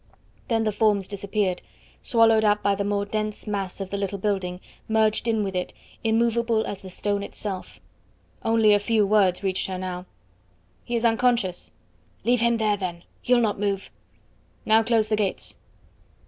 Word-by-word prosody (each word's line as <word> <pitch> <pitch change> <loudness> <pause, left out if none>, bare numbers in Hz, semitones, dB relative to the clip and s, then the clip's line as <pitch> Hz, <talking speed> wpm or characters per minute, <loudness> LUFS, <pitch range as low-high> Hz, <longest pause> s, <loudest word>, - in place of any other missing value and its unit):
Then 225 -1 +1
the 215 - +1
forms 205 -3 +2
disappeared, 200 -2 -2 0.4
swallowed 225 -2 +4
up 210 0 +2
by 200 - +3
the 200 - -1
more 200 0 0
dense 215 0 -3
mass 200 -3 -3
of 195 -1 -5
the 200 - -2
little 200 0 -2
building, 190 -3 -2 0.3
merged 220 +1 +2
in 220 -2 +1
with 195 -2 -3
it, 180 - -2 0.3
immovable 230 0 +2
as 195 - -5
the 190 - -9
stone 200 +2 -2
itself. 200 -1 -6 0.6
Only 225 -2 +4
a 205 - +4
few 215 0 +2
words 195 -2 +3
reached 190 -1 -1
her 190 -1 -4
now. 180 0 -5 0.8
"He 240 - -3
is 235 0 0
unconscious." 230 -5 +1 0.5
"Leave 245 0 +2
him 235 0 +3
there, 215 -2 +1
then; 175 -3 -5 0.2
he'll 250 0 +3
not 210 -3 0
move!" 200 -1 -2 0.7
"Now 220 +1 +5
close 225 -1 +2
the 215 - +1
gates!" 210 -3 -2
210 Hz, 165 wpm, -25 LUFS, 195-225 Hz, 0.8 s, Now